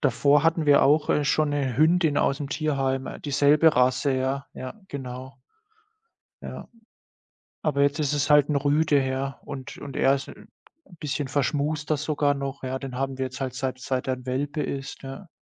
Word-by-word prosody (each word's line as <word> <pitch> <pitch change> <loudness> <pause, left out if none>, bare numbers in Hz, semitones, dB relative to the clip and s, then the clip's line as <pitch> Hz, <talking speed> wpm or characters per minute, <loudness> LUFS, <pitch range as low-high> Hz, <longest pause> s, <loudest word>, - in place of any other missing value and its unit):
Davor 140 +4 +3
hatten 165 -1 +2
wir 145 -1 +5
auch, 150 +2 +3
äh, 150 - +2
schon 150 +1 +1
'ne 135 -4 -1
Hündin 160 -1 +3
aus'm 140 0 0
Tierheim, 135 -4 -2
dieselbe 145 +2 +4
Rasse, 130 +2 +2
ja. 135 +2 -2
Ja, 130 +12 -8
genau. 130 -1 -7 1.1
Ja, - - -8 0.9
aber 140 -2 +1
jetzt 140 +2 +2
ist 145 -1 0
es 145 0 0
halt 150 -1 +6
'n 150 - +1
Rüde, 145 0 +2
ja, 135 +1 -3
und 135 -3 -8
und 140 -2 -8
er 135 - +4
ist 140 - -5
'n - - -13 0.5
bisschen 145 -1 -3
verschmuster 150 +2 0
sogar 145 -1 0
noch, 140 -1 -5
ja. 130 0 -2
Den 130 -2 -7
haben 135 0 -2
wir 130 - -1
jetzt 130 +1 -9
halt 130 -2 -3
seit 130 0 -3
seit 130 0 -2
er 130 - +2
'n 125 0 -14
Welpe 145 +4 -2
ist, 135 +1 -5
ja. 135 +8 -8
140 Hz, 180 wpm, -25 LUFS, 130-150 Hz, 1.1 s, halt